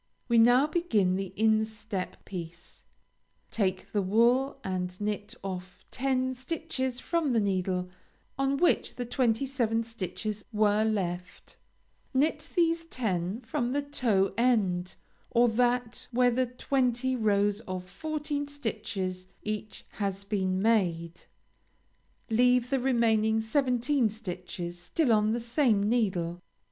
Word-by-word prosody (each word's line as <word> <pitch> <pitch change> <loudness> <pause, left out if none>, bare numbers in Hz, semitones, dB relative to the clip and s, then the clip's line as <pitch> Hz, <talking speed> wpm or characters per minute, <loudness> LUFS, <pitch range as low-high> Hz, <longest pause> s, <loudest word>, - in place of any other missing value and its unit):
We 235 -2 +4
now 245 +4 +6
begin 230 - +1
the 195 -1 -3
instep 220 -2 -1
piece. 175 -1 -8 0.7
Take 190 -4 -1
the 205 - +1
wool 240 +8 +3
and 180 -1 -3
knit 210 0 -3
off 185 -1 -7
ten 260 0 0
stitches 260 -2 -3
from 320 -3 0
the 230 - +4
needle 185 -2 0 0.5
on 275 0 +1
which 345 +4 +2
the 245 - -4
twenty 240 0 +1
seven 235 -4 0
stitches 215 -1 -5
were 215 -1 +3
left; 180 -5 -3 0.6
knit 295 +5 +1
these 335 -1 +2
ten 205 - -2
from 245 0 -2
the 285 0 0
toe 230 -10 +1
end, 190 -8 +1 0.3
or 240 +1 +4
that 245 +1 0
where 245 0 +3
the 255 +1 +1
twenty 255 0 0
rows 205 -2 +2
of 185 -1 -4
fourteen 295 +4 -3
stitches 205 -9 -4 0.2
each 215 0 -5
has 195 -1 -3
been 190 -2 -1
made; 175 -6 +1 1.1
leave 245 +2 +3
the 270 - +2
remaining 225 -4 +2
seventeen 250 +1 +1
stitches 180 -4 -6
still 245 - +1
on 215 0 +3
the 235 - 0
same 230 -4 +2
needle. 185 -7 0
220 Hz, 125 wpm, -29 LUFS, 195-255 Hz, 1.1 s, now